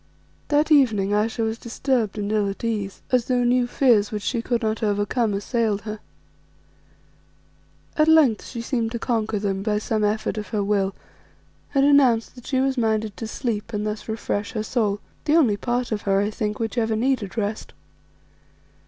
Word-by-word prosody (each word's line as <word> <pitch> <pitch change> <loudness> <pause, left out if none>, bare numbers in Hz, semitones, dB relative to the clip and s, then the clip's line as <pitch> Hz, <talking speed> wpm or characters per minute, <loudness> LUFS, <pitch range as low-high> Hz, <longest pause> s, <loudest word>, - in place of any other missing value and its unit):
That 300 +2 +2
evening 220 -9 +4
Ayesha 220 +3 0
was 220 +1 -2
disturbed 235 -3 -1
and 205 0 -2
ill 210 -2 +1
at 195 - -7
ease, 210 -4 -3
as 250 -2 +3
though 250 -1 +1
new 245 0 +2
fears 235 -6 +3
which 210 -2 -4
she 235 +1 -1
could 235 0 -1
not 220 +1 -1
overcome 210 +2 0
assailed 210 0 0
her. 215 0 -6 2.0
At 305 -1 +3
length 305 -9 +5
she 235 - -6
seemed 235 -3 -1
to - - -1
conquer 225 -2 -1
them 195 -1 -2
by 210 0 0
some 215 0 -1
effort 215 +1 0
of 210 - -6
her 205 +1 -1
will 200 -1 0 0.8
and 275 0 +4
announced 265 -6 +4
that 245 -2 -13
she 260 - +1
was 265 -1 +1
minded 220 -2 0
to 225 - -5
sleep 225 -1 -3
and 210 0 -2
thus 215 +1 -4
refresh 220 -1 -3
her 215 -3 -2
soul; 210 -3 -1 0.2
the 300 - +3
only 255 -11 +4
part 240 +4 -2
of 210 -1 -1
her, 195 0 +4
I 205 +2 0
think, 210 0 -3
which 225 +1 -2
ever 225 -1 0
needed 235 -3 -1
rest. 210 0 -3
220 Hz, 180 wpm, -23 LUFS, 210-245 Hz, 2.0 s, length